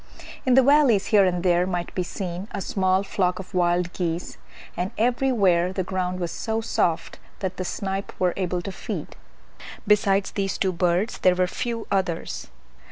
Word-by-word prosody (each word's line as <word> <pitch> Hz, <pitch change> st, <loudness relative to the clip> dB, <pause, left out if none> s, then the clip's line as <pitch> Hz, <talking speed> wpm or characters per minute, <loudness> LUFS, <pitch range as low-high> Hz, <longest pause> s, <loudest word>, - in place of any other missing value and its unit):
In 250 Hz, -, +5 dB
the 265 Hz, -, +7 dB
valleys 265 Hz, -8 st, +5 dB
here 200 Hz, -2 st, +7 dB
and 180 Hz, -1 st, 0 dB
there 180 Hz, 0 st, +3 dB
might 175 Hz, -2 st, -3 dB
be 185 Hz, -, -1 dB
seen 180 Hz, +1 st, -5 dB
a -, -, -2 dB
small 190 Hz, -3 st, +1 dB
flock 185 Hz, -2 st, 0 dB
of 190 Hz, +1 st, -9 dB
wild 175 Hz, 0 st, +1 dB
geese, 170 Hz, -1 st, -3 dB, 0.4 s
and 180 Hz, +2 st, -2 dB
everywhere 215 Hz, -7 st, +2 dB
the 190 Hz, 0 st, -2 dB
ground 185 Hz, 0 st, -2 dB
was 170 Hz, -2 st, -2 dB
so 220 Hz, 0 st, -2 dB
soft 170 Hz, -7 st, -1 dB, 0.2 s
that 190 Hz, -2 st, -4 dB
the 185 Hz, -, -2 dB
snipe 195 Hz, +1 st, -3 dB
were 180 Hz, -1 st, +2 dB
able 180 Hz, -2 st, -2 dB
to 195 Hz, -, -4 dB
feed. -, -, -6 dB, 0.7 s
Besides 200 Hz, -2 st, +3 dB
these 195 Hz, -1 st, -2 dB
two 190 Hz, -, +1 dB
birds 180 Hz, +5 st, 0 dB
there 180 Hz, -1 st, +4 dB
were 185 Hz, 0 st, +2 dB
few 230 Hz, +5 st, -3 dB
others. 170 Hz, -, -1 dB
185 Hz, 170 wpm, -24 LUFS, 180-200 Hz, 0.7 s, the